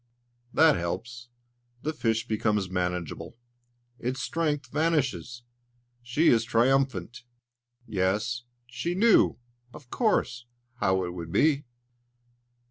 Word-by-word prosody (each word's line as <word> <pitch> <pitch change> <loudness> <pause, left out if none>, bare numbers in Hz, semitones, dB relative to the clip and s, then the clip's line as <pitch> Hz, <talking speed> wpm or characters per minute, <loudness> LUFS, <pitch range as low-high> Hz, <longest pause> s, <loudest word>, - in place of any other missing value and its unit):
That 160 +1 +5
helps; 120 +8 -5 0.5
the 155 - -1
fish 115 -5 -1
becomes 105 -4 0
manageable, 90 +1 -3 0.6
its 125 +2 -3
strength 150 -4 -2
vanishes. 140 -6 0 0.6
She 125 +7 +2
is 115 -2 +4
triumphant. 120 -2 +1 0.6
Yes, 110 +3 0 0.2
she 125 +9 -3
knew, 220 +3 +4 0.4
of 130 -5 -14
course, 125 - 0 0.3
how 95 -4 +1
it 90 - -5
would 85 -2 -7
be! 145 - +2
120 Hz, 100 wpm, -27 LUFS, 105-145 Hz, 0.6 s, That